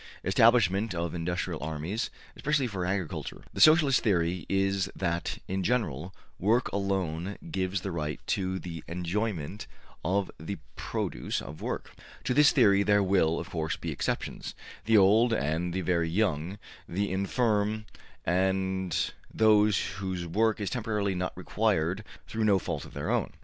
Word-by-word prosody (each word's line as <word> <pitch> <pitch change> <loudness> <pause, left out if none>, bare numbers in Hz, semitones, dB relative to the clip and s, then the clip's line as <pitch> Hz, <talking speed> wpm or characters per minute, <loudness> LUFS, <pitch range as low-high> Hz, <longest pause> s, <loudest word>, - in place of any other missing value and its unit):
Establishment 105 -1 +4
of 85 0 -2
industrial 85 -1 -2
armies, 80 +8 -3 0.3
especially 140 +2 +1
for 95 -6 -3
agriculture.'' 95 -4 -3
The - - -2
Socialist 155 -4 +7
theory 90 -5 +1
is 95 0 +1
that, 85 -2 -1
in 95 +1 -1
general, 90 - -1 0.3
work 115 +6 +2
alone 95 -2 -1
gives 95 - -1
the 95 - -4
right 75 -3 -3
to 95 -1 -1
the 85 -4 -7
enjoyment 90 +1 -3 0.4
of 95 +3 0
the 90 +6 -5 0.2
produce - - -2
of 75 - -9
work. - - -4 0.3
To 125 - 0
this 150 +3 +6
theory 100 -6 +5
there 105 0 +4
will, 90 -4 +2
of 85 - -7
course, 80 -2 -1
be - - -5
exceptions: - - -3 0.3
the 110 0 +5
old 110 +5 +5
and 80 -1 0
the 95 +2 -1
very 85 -2 +1
young, 90 -1 0 0.3
the 100 +3 -1
infirm 105 +2 +1 0.4
and 95 -1 +1 0.3
those 105 -2 +4 0.2
whose 95 -3 -3
work 110 +6 +1
is 100 - -2
temporarily 105 -5 -1
not 90 -1 -3
required 90 +7 0 0.2
through 110 -1 -1
no 100 -2 +5
fault 80 -5 -4
of - - -13
their - - -2
own. - - 0
95 Hz, 150 wpm, -29 LUFS, 85-105 Hz, 0.4 s, Socialist